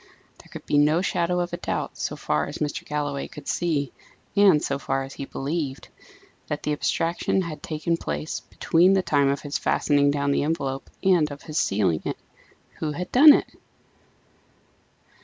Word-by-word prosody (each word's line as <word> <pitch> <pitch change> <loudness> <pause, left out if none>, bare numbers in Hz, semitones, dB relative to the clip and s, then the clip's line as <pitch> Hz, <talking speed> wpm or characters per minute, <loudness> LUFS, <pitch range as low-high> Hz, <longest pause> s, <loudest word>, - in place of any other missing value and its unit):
There - - -16
could - - -10
be 145 - +2
no 155 +4 +3
shadow 180 -1 0
of 175 - -3
doubt, - - -3
so - - -3
far 75 0 -1
as - - -6
Mr. 150 -2 -3
Galloway 145 -2 -3
could 145 -1 -12
see, 150 -6 -1 0.4
and 200 -6 +6
so 140 -1 -2
far 135 -1 -1
as 135 +1 -9
he 140 - -6
believed, 140 0 -4 0.6
that 150 0 -4
the 150 - 0
abstraction 170 +5 0
had 165 -3 -7
taken 160 +2 -2
place 75 - -4
between 175 +4 +2
the 190 -1 +2
time 140 -4 +2
of 140 0 -1
his 145 -1 -3
fastening 145 -1 +2
down 140 0 0
the - - +1
envelope 140 -3 -2
and 175 -5 +4
of 145 0 -9
his 155 -1 -2
sealing 95 -6 +1
it. - - -3 0.6
Who 155 -2 -2
had 180 +4 -5
done 295 +4 +9
it? - - +4
150 Hz, 175 wpm, -24 LUFS, 140-170 Hz, 0.6 s, done